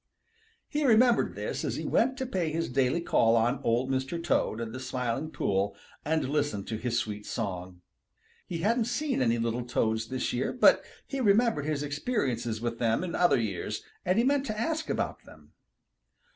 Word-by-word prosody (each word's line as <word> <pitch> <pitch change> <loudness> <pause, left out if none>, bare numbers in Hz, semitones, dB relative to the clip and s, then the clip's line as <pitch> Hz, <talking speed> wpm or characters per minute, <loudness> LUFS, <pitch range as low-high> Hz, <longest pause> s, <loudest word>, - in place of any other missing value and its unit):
He 300 +1 -1
remembered 240 -1 +4
this - - -3
as - - -2
he - - -4
went 260 +2 +2
to 260 - -2
pay 185 -10 -1
his 165 +1 -2
daily 135 +5 +2
call 115 -8 +3
on 120 +4 +2
Old 120 +3 +1
Mr. 130 +5 -1
Toad 165 -9 0
in 115 -1 -4
the 130 - -6
Smiling 130 +2 -2
Pool 100 -8 0 0.3
and 160 -2 0
listen 145 -7 -1
to 110 +2 -4
his 120 +1 -1
sweet 105 -3 -3
song. 90 -5 -5 0.7
He 170 - -3
hadn't 230 +4 +2
seen 255 - -1
any 120 -2 +2
little 115 +1 -1
Toads 110 -2 0
this 130 +1 -2
year, 125 +2 -1
but 250 - +5 0.2
he 275 -1 -3
remembered 210 - +3
his 150 -2 -1
experiences 140 - -1
with 115 0 -3
them 115 +5 +1
in 180 - -4
other 175 -7 +4
years, 100 -6 -3 0.2
and 185 +2 +1
he 230 - +4
meant 280 0 +2
to 215 0 -3
ask 320 +5 -1
about - - -2
them. - - -17
135 Hz, 185 wpm, -29 LUFS, -, 0.7 s, but